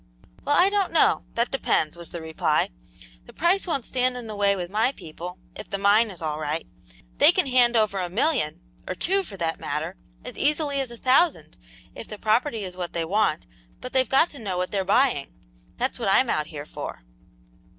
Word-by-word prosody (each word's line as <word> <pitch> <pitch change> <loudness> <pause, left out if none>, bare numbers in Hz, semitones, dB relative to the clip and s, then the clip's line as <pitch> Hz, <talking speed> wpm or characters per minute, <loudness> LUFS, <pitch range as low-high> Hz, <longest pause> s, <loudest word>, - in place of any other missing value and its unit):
"Well, 290 - +2
I 375 +3 +5
don't 400 -2 +1
know; - - +3
that 235 +1 0
depends," 160 - 0
was 170 -1 -10
the 170 -2 -7
reply. 160 - 0 0.6
"The - - -13
price 365 +4 +1
won't 280 -8 -1
stand 255 0 0
in 245 - -7
the 215 -1 -6
way 200 -1 +2
with 180 -1 -5
my 220 +5 +2
people, 175 - -8 0.2
if - - -9
the 200 - -2
mine 205 +3 +4
is 180 -4 -7
all 155 -1 -2
right. 155 +1 -2 0.5
They - - +8
can - - +1
hand 250 -2 +4
over 215 -3 +2
a 180 -1 -2
million 230 - 0 0.3
or - - -3
two, 390 - +1
for 205 - -8
that 165 -2 -2
matter - - -3 0.3
as - - -8
easily 290 -1 +1
as 265 - -4
a 235 - -9
thousand, 270 +8 +2 0.4
if - - -9
the 210 - -8
property 225 +2 +1
is 180 -2 -6
what 180 -2 -5
they 165 -1 -1
want, 195 -3 +1 0.3
but 255 - -8
they've 260 -1 +2
got 275 +6 +4
to 285 - -11
know 195 -5 -3
what 180 0 -2
they're 195 -2 0
buying. 200 - +1 0.4
That's - - -2
what - - 0
I'm - - +4
out - - -1
here - - -7
for." - - -7
215 Hz, 210 wpm, -25 LUFS, 180-265 Hz, 0.6 s, They